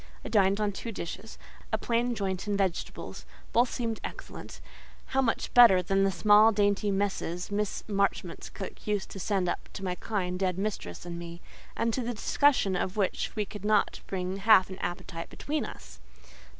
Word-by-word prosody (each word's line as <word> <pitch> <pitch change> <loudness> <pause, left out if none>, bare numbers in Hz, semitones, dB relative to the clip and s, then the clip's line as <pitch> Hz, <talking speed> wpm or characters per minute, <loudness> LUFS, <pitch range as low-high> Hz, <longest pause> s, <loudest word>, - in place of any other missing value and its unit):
I - - -4
dined 200 -1 +3
on 210 -1 +1
two 230 +4 -6
dishes—a 195 +2 -7
plain 240 +1 0
joint 195 -1 -3
and 205 -1 0
vegetables; 190 -4 -3 0.3
both 240 +1 +4
seemed 230 -2 -2
excellent: - - -8 0.5
how 270 - +4
much 230 -3 -1
better 215 -7 +8
than 195 +2 +2
the 195 - +2
small, 210 +5 +6
dainty 205 0 +2
messes 195 -2 -2
Miss 205 0 -1
Marchmont's 200 -1 -1
cook - - -8
used 205 -2 -1
to 195 - -7
send 190 -2 0
up - - -3
to 195 - -7
my 180 -2 -1
kind, 180 -2 -3
dead 185 -2 0
mistress 195 - -4
and 170 -1 -5
me, 170 0 -8 0.4
and 230 0 +1
to 255 - 0
the 240 0 -3
discussion 245 -4 +3
of 185 +2 -2
which 200 +2 -1
we 210 -2 0
could 205 0 -9
not 215 0 +2
bring 185 0 -3
half 195 -2 +5
an 190 - -7
appetite 170 -1 -5
between 300 +1 -3
us! 65 - -11
200 Hz, 175 wpm, -29 LUFS, 185-215 Hz, 0.5 s, better